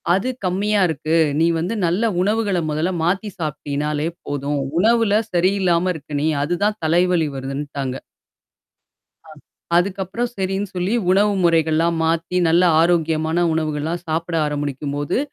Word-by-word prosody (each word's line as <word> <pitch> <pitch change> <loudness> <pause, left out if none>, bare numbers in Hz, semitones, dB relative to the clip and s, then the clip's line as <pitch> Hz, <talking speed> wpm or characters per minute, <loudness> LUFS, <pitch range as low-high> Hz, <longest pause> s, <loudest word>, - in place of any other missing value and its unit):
அது 195 +7 -1 0.2
கம்மியா 200 +3 +1
இருக்கு. 155 0 -1 0.2
நீ 165 - +4
வந்து 175 +7 -2
நல்ல 180 +7 0 0.2
உணவுகள 205 -1 +1
முதல்ல 155 +4 0
மாத்தி 190 +5 0
சாப்பிடீனாலே 150 0 -2 0.2
போதும். 145 0 -2 0.2
உணவுல 225 +1 +3 0.2
சரியில்லாம 185 -1 +2
இருக்க 145 -1 -5
நீ - - +2 0.2
அதுதான் 200 +7 0
தலைவலி 175 0 +2
வருதுன்ட்டாங்க. 135 0 -4 1.3
ஆ - - -16 0.5
அதுக்கப்புறம் 195 +6 -1
சரின்னு 195 +1 -2
சொல்லி 180 +4 -1 0.2
உணவு 205 +2 +3
முறைகள்லாம் 165 0 +2
மாத்தி 165 +2 0
நல்ல 170 +2 +4 0.2
ஆரோக்கியமான 165 0 +1
உணவுகள்லாம் 160 +2 -2
சாப்பிட 165 +1 -2
ஆரம்பிக்கும்போது, 145 - -2
170 Hz, 115 wpm, -20 LUFS, 150-190 Hz, 1.3 s, நீ